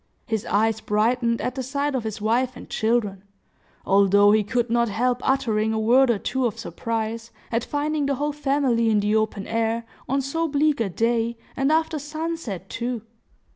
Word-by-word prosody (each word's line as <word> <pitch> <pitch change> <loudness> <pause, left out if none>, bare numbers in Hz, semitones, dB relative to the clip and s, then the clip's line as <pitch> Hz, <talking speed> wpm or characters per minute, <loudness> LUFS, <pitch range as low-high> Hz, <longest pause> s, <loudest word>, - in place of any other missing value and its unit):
His 220 -3 -2
eyes 220 +2 +1
brightened 230 +3 +1
at 250 - -2
the 260 - -4
sight 280 +3 -2
of 250 -4 -2
his 220 -1 -4
wife 240 +4 +1
and - - -10
children, 220 -4 0 0.6
although 200 +1 +5
he 215 0 +4
could 240 +2 -1
not 235 -1 +2
help 245 +4 0
uttering 220 -5 +1
a 220 - 0
word 250 +4 +4
or 235 - +3
two 255 +5 -1
of 215 - -5
surprise, 225 +4 -4 0.2
at 230 0 0
finding 295 0 -1
the 280 - +1
whole 295 +2 -2
family 270 -5 +1
in 215 -1 +3
the 205 +1 +1
open 215 -2 0
air, 230 0 -1 0.2
on 275 +2 +2
so 325 +5 -1
bleak 295 -1 +1
a 225 -4 0
day, 230 +4 0 0.2
and 270 +2 +1
after 320 0 +1
sunset 300 - -5
too. 240 0 -4
235 Hz, 180 wpm, -24 LUFS, 220-270 Hz, 0.6 s, although